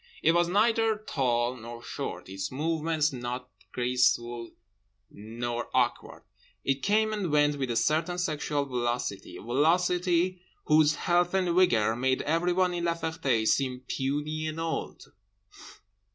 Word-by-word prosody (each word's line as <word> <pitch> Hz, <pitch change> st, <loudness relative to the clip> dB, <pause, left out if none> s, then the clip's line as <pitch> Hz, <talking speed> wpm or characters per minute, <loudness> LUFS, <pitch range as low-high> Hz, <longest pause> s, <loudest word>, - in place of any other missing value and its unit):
It 160 Hz, -, +5 dB
was 170 Hz, +1 st, +3 dB
neither 220 Hz, +3 st, +2 dB
tall 125 Hz, -, 0 dB
nor 120 Hz, 0 st, -9 dB
short, -, -, -5 dB
its 95 Hz, +1 st, -5 dB
movements 155 Hz, +1 st, 0 dB
nor 125 Hz, 0 st, -4 dB, 0.3 s
graceful 120 Hz, -1 st, +1 dB, 0.6 s
nor 120 Hz, +3 st, -5 dB
awkward. 125 Hz, -2 st, 0 dB, 0.4 s
It 135 Hz, 0 st, 0 dB
came 215 Hz, +4 st, +2 dB
and 195 Hz, -6 st, -2 dB
went 145 Hz, -1 st, +3 dB
with 135 Hz, -2 st, -2 dB
a 120 Hz, -, -1 dB
certain 160 Hz, +8 st, +1 dB
sexual 150 Hz, -4 st, -1 dB
velocity, 120 Hz, -6 st, -3 dB
a -, -, -11 dB
velocity 175 Hz, +6 st, +2 dB, 0.2 s
whose 150 Hz, -1 st, +4 dB
health 175 Hz, +1 st, +1 dB
and 180 Hz, -3 st, +1 dB
vigour 115 Hz, -, +3 dB
made 130 Hz, +2 st, 0 dB
everyone 175 Hz, +3 st, +1 dB
in 175 Hz, 0 st, -2 dB
La 170 Hz, -1 st, +1 dB
Ferté 160 Hz, -9 st, -1 dB
seem 130 Hz, 0 st, +1 dB
puny 150 Hz, +3 st, -2 dB
and 155 Hz, +1 st, -4 dB
old. 165 Hz, 0 st, -4 dB
150 Hz, 135 wpm, -28 LUFS, 120-175 Hz, 0.6 s, It